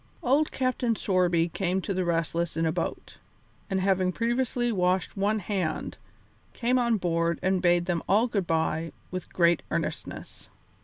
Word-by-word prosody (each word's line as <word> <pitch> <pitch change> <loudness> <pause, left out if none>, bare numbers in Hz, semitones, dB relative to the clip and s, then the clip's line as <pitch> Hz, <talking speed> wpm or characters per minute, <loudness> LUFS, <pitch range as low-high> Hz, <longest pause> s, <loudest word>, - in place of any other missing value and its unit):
Old 280 +5 +2
Captain 255 -3 0
Sorby 180 -4 +2
came 185 +2 -1
to 195 - -3
the 185 0 0
Restless 170 0 -1
in 165 - +1
a 160 - +2
boat, 165 0 -4 0.5
and 190 -2 0
having 185 -1 +2
previously 240 +2 0
washed 185 -2 0
one 205 +2 +1
hand, 190 -5 -3 0.5
came 250 +1 +1
on 235 -2 +2
board 170 -2 0
and 185 0 +2
bade 175 -1 +3
them 175 -2 -1
all 215 +4 +4
good 200 -7 -1
bye 160 0 0 0.2
with 185 -1 -6
great 170 -2 +3
earnestness. - - -5
185 Hz, 155 wpm, -27 LUFS, 170-220 Hz, 0.5 s, all